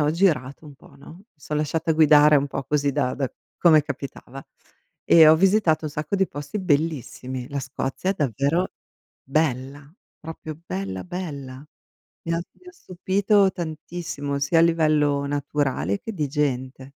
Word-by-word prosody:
ho 150 0 +2
girato 155 -5 0
un 145 - -12
po', - - -19
no? 140 +4 -13
Mi 190 - -19
son 150 +1 -5
lasciata 160 +2 0
guidare 150 -1 +6
un 140 0 +1
po' 135 - -4
così 145 0 0
da 125 - 0
da 135 -3 -3 0.2
come 160 -3 +5
capitava, 135 -1 -8 0.6
e 165 -2 +7
ho 155 - +8
visitato 185 -3 +2
un - - -5
sacco 150 +6 -3
di 190 -1 +1
posti 145 +8 -6
bellissimi. 145 - -2
La 140 0 -3
Scozia 135 +6 -3
è - - +2
davvero 145 - 0 0.5
bella, 140 0 -2 0.3
proprio 160 -1 -8
bella 95 0 -4
bella. 145 -7 -7 0.6
Mi 165 - -2
ha 165 - -1
mi 365 - -22
ha - - -10
stupito 195 - +1
tantissimo, 155 -4 -5
sia 145 +4 +2
a - - +6
livello 155 -4 +2
naturale 140 - -1
che 225 - -7
di 155 -7 -2
gente. 130 -3 -2
150 Hz, 160 wpm, -23 LUFS, 140-165 Hz, 0.6 s, ho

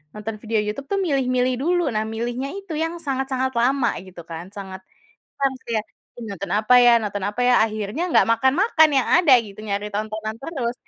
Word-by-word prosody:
nonton 215 +1 -5
video 220 -1 0
YouTube 215 +7 -5
tuh 395 - +1
milih-milih 255 -5 +1
dulu, 350 -1 +1
nah 215 0 0
milihnya 240 +4 -3
itu 395 -5 -7
yang 325 +2 -2
sangat 270 -3 -2
sangat 260 0 0
lama 250 0 +2
gitu 185 -2 -11
kan. 170 +3 -8
Sangat, 190 -2 -8 0.6
kurang 275 -1 0
sih 235 - -4
ya, - - -3 0.4
Ih 230 - -7
nonton 200 -1 -6
apa 215 +4 +3
ya 240 -1 +7
nonton 205 -1 -3
apa 210 +5 -2
ya? 250 - +4
Akhirnya 215 - -4
nggak - - +5
makan-makan 310 - +4
yang 260 - +2
ada 305 -7 +5
gitu, 210 -2 -9
nyari 205 0 -3
tontonan 215 +1 -3
terus. 260 -6 -3
235 Hz, 195 wpm, -22 LUFS, 210-275 Hz, 0.6 s, ya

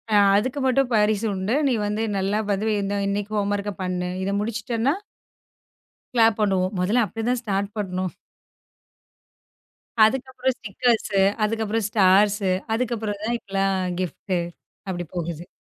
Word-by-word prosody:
ஆ, - - +7 0.2
அதுக்கு 255 +7 0
மட்டும் 265 0 +2
பரிசு 210 0 +2
உண்டு. 195 +5 -1
நீ 265 - +2
வந்து 210 +2 -1
நல்லா 195 +2 0
வந்து 200 +2 0
இந்த 200 +1 -2
இன்னக்கி 205 +1 -2
ஹோம் 205 0 0
ஒர்க்க 205 0 -3
பண்ணு. 180 -1 -2
இத 195 - -1
முடிச்சிட்டன்னா 230 +4 -1 1.2
கிளாப் 225 -3 +4
பண்ணுவோம். 190 -2 +1
முதல்ல 210 +7 +2
அப்பிடிதான் 230 +4 -2
ஸ்டார்ட் 200 -2 -1
பண்ணும். 185 -3 -2 1.9
அதுக்கு 260 +4 0
அப்பறம் 260 0 -1
ஸ்டிக்கர்ஸ் 230 0 0 0.3
அதுக்கப்பறம் 220 0 0
ஸ்டார்ஸ் 205 0 +4 0.3
அதுக்கப்பறந்தான் 225 -1 -2
எல்லாம் 195 0 0 0.2
கிப்ட் 185 +1 -3 0.5
அப்பிடி 175 -1 -3
போகுது. 170 0 -4
210 Hz, 125 wpm, -24 LUFS, 195-230 Hz, 1.9 s, ஆ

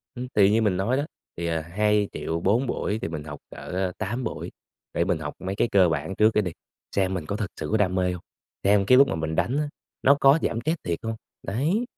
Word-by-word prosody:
Ưm, 125 0 -4
thì 100 -1 +6
như 110 +2 +3
mình 100 -4 +2
nói 115 +8 +1
đó, 145 - 0 0.3
thì, 85 0 -3
à, 80 -1 0
2.000.000, 95 -3 0
4 115 +9 +2
buổi 110 -3 -1
thì - - -1
mình 75 -2 -5
học 75 -1 -7
cỡ, - - -10
ơ, 90 0 -2
8 120 +5 -2
buổi, - - -5 0.4
để 85 - +1
mình 90 -3 0
học 75 -2 -5
mấy 95 +1 -4
cái 120 - +2
cơ 95 -3 +5
bản 80 +3 -2
trước 110 +1 +5
cái 105 - +3
đi, 90 - -3 0.4
xem 95 -1 +2
mình 85 -4 -4
có 100 - -2
thực 105 -2 -3
sự - - -3
có 110 - +3
đam 95 -4 +2
mê 90 -1 +1
hông, 90 - -7 0.4
xem 100 0 +4
cái 125 +2 +7
lúc 140 0 +7
mà - - -1
mình 80 0 -2
đánh 130 - +1
á, 150 -1 0 0.3
nó 140 - +7
có 135 +3 +6
giảm 115 - 0
stress 160 +7 0
thiệt 85 -1 -1
hông, 115 0 -3 0.3
đấy. 155 - 0
100 Hz, 255 wpm, -25 LUFS, 90-115 Hz, 0.4 s, cái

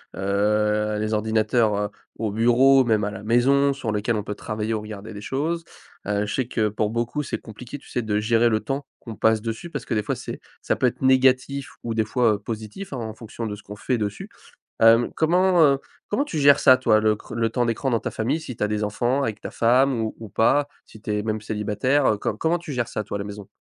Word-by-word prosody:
heu, 105 +2 +1
les 110 +1 -1
ordinateurs, 110 +1 +2
heu, 105 0 -1 0.3
au 110 -2 -2
bureau, 125 +5 +5
même 110 -2 +2
à 105 - -1
la 100 -1 -8
maison, 135 +5 +3
sur 130 -5 -3
lequel 105 +2 0
on 105 - -2
peut 105 - -4
travailler 110 +2 -3
ou 110 - -2
regarder 105 0 -8
des 100 - -8
choses. 160 +8 -2 0.4
Heu, 105 0 0
je 105 - -4
sais 130 -3 -1
que 110 -3 0
pour 105 0 -1
beaucoup 120 +6 -2
c'est 145 - -4
compliqué, 120 +5 -9
tu 135 - -18
sais, 125 - -2
de 105 -2 0
gérer 115 +2 +3
le 110 -1 +1
temps 135 +5 -3
qu'on 115 -3 -9
passe 110 +1 +2
dessus 115 +9 -5
parce 140 -6 -6
que - - -3
des 105 - 0
fois - - -2
c'est, - - -7 0.2
ça - - +1
peut 130 - +2
être 120 - -4
négatif 130 +1 +3
ou 115 -1 -2
des 110 - +1
fois, 115 +1 +2
heu, 105 - -3
positif 110 - -7
hein - - -3
en 110 -2 -5
fonction 115 +1 -7
de 105 -2 -4
ce 105 - -14
qu'on 105 - -9
fait 120 +5 -1
dessus. 105 -1 -4 0.5
Hem, 115 +1 +6
comment, 180 +2 +3
heu, 140 -3 +5 0.3
comment 240 +7 0
tu 170 - -4
gères 140 0 +6
ça 130 0 +7
toi 110 -4 +3
le 110 0 +3
cr - - -12
le 115 0 0
temps 120 +2 0
d'écran 120 +4 -1
dans 115 - +2
ta - - -4
famille, 130 +8 -1
si 130 -6 -7
tu 105 - -3
as 105 - 0
des 105 0 -1
enfants 120 +6 0
avec 110 -4 -3
ta - - -6
femme 125 +2 +3
ou 110 - -3
ou 110 -2 -9
pas. 140 +8 +2 0.2
Si 110 - -15
tu 105 - -4
es - - -1
même 110 0 -2
célibataire, 110 +7 0
heu, - - -3
co 105 +1 -3
comment 165 +6 +1
tu 170 -3 -8
gères 120 -2 -1
ça 105 - -4
toi 100 0 -4
à - - -8
la 100 - -4
maison? 105 -1 -8
115 Hz, 255 wpm, -23 LUFS, 105-130 Hz, 0.5 s, ça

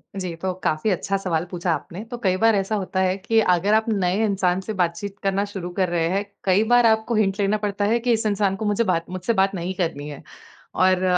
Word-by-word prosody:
जी, 185 -3 -4
तो 185 +2 -3
काफ़ी 155 +8 0
अच्छा 195 +1 0
सवाल 175 -4 -1
पूछा 175 -1 -1
आपने। 185 +6 -6
तो 240 - -4
कई 185 -1 +2
बार 225 0 +4
ऐसा 195 +2 0
होता 190 -2 -2
है 185 0 +1
कि 220 +3 +1
अगर 185 +1 +2
आप 220 0 +3
नए 195 0 +1
इंसान 190 -3 +1
से 215 +3 -5
बातचीत 190 +2 -2
करना 195 +1 +1
शुरू 195 -3 -6
कर 185 -2 +2
रहे 170 -1 0
हैं, 195 +3 -1 0.2
कई 195 +3 +3
बार 245 -1 +6
आपको 220 +1 +2
हिंट 200 -2 +1
लेना 205 +1 +2
पड़ता 205 -1 -2
है 230 +3 +2
कि 240 0 +1
इस 225 0 -1
इंसान 200 -2 +1
को 215 +2 -4
मुझे 210 +2 +1
बात 170 -5 -1
मुझसे 185 +5 -2
बात 195 -1 +2
नहीं 180 +1 -3
करनी 160 -5 -2
है। 145 - -9 0.5
और 185 0 +3
195 Hz, 235 wpm, -23 LUFS, 180-210 Hz, 0.5 s, बार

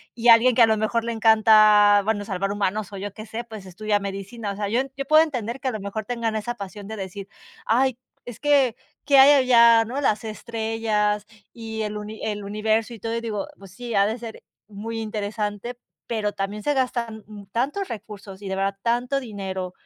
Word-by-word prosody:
y 240 +1 +2
alguien 235 +2 +7
que 240 - +6
a - - +9
lo 220 - +3
mejor 220 +2 0
le 235 - -2
encanta, 215 -2 +6
bueno, 205 -1 -1
salvar 195 0 -2
humanos, 205 0 -2
o 200 - -7
yo 200 +1 -6
qué 215 +1 -10
sé, 225 +3 -5
pues, 220 -5 -10
estudia 205 +3 -1
medicina. 200 +2 -5
O - - -6
sea, 205 0 -3
yo 235 +4 +2 0.2
yo 275 - -3
puedo 310 +2 +6
entender 250 -6 -2
que 270 - -4
a - - +1
lo 215 - -5
mejor 200 +2 -5
tengan 230 -1 -2
esa 220 +3 -3
pasión 200 -1 -8
de 220 - -6
decir: 195 0 -7 0.4
"Ay, 255 +3 +2 0.3
es 245 -2 -9
que, 280 -5 +3 0.3
¿qué 280 -1 +5
hay 275 +2 +9
allá, 235 -4 +6
no? 260 +5 -4
Las 215 -5 +1
estrellas 220 -2 -2 0.3
y 220 -1 -5
el 210 0 -4
uni 210 +1 -8
el 210 -1 -3
universo 215 +3 -1
y 225 - -14
todo". 225 +3 -3
Y 230 - -2
digo: 215 -3 -4
"Pues 195 -2 -14
sí, 240 +4 -7
ha 200 0 +4
de 220 +2 -2
ser 230 -2 -9 0.3
muy 220 +2 -6
interesante, 210 +1 -4 0.3
pero 215 -3 -1
también 205 +1 -4
se 290 - +1
gastan 235 -4 -2 0.3
tantos 285 - -1
recursos", 205 -3 -9
y 200 - -7
de 190 - -2
verdad 195 +1 -1
tanto 245 +4 0
dinero 190 -6 -5
220 Hz, 210 wpm, -23 LUFS, 205-235 Hz, 0.4 s, a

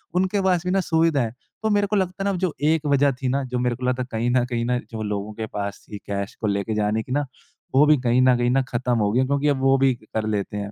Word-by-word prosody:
उनके 190 +2 +1
पास 185 -3 +2
भी 180 - 0
ना 195 - +2
सुविधा 160 -4 +2
है। 115 -2 -2 0.3
तो 220 - +1
मेरे 205 -1 +2
को 210 - -1
लगता 185 -2 0
है - - 0
ना - - +2
अब 190 - -2
जो 180 -3 0 0.2
एक 160 -1 +1
वज़ह 140 -1 +3
थी 130 - -1
ना, 135 +2 0
जो 125 -1 -3
मेरे 125 -1 0
को 125 - -6
लगता 125 0 0
है - - -10
कहीं 115 +2 -1
न 125 0 +3
कहीं 120 -2 -2
न 125 +1 +1
जो 110 -1 -5
लोगों 105 0 -3
के 110 +1 -4
पास 100 -1 -5
थी 105 - -6
कैश 100 0 -5
को 110 - 0
लेके 100 +2 -1
जाने 105 +1 0
की 125 - -11
ना 145 +2 +1 0.5
वो 140 +3 +7
भी 150 0 +5
कहीं 125 0 +3
न 130 -1 +5
कहीं 120 0 +1
न 135 +1 +3
ख़त्म 120 0 0
हो 105 -1 +1
गई 120 - +2
है 130 - +3
क्योंकि 140 +2 0
अब 140 -2 +2
वो 135 0 +4
भी 135 -1 +3
कर 110 0 -3
लेते 105 -1 -2
हैं। 100 0 -4
125 Hz, 310 wpm, -23 LUFS, 110-150 Hz, 0.5 s, वो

